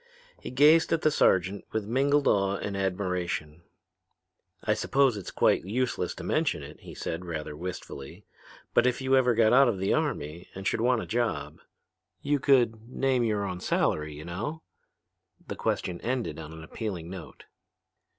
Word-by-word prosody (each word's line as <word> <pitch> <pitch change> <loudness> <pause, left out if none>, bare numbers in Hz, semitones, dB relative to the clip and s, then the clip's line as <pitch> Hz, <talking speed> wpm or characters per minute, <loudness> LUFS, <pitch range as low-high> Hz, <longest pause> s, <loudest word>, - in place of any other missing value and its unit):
He - - -7
gazed 150 +5 +5
at 165 - +1
the 155 - +4
sergeant 95 -6 +2
with 110 -2 -2
mingled 140 +5 +2
awe 100 -1 +3
and 100 0 -4
admiration. 90 -4 -2 1.0
"I - - +2
suppose 135 -3 +2
it's 100 -3 -6
quite - - +2
useless 115 -2 -1
to - - -8
mention - - 0
it," - - -11
he - - -11
said 85 +2 -4
rather 75 -3 -5
wistfully, 85 -5 -7 0.5
"but 120 - +4
if 125 -1 0
you 130 0 +2
ever 125 -2 +4
get 110 0 +4
out 135 +1 +7
of 115 -5 0
the 95 +1 +1
army 75 +4 -2
and 95 +1 -7
should 110 - 0
want 125 -1 +2
a - - -7
job.... 120 0 -2 0.6
You 145 0 0
could 120 -4 +2
name 130 -1 +1
your 105 -3 0
own 90 -2 -4
salary, 75 -3 0
you 75 - -9
know?" 120 - -5 0.8
The - - -4
question 90 -2 -2
ended 125 -7 -2
on 80 -1 -8
an 80 0 -10
appealing 90 -1 -5
note. 95 -4 -9
105 Hz, 170 wpm, -28 LUFS, 90-125 Hz, 1.0 s, out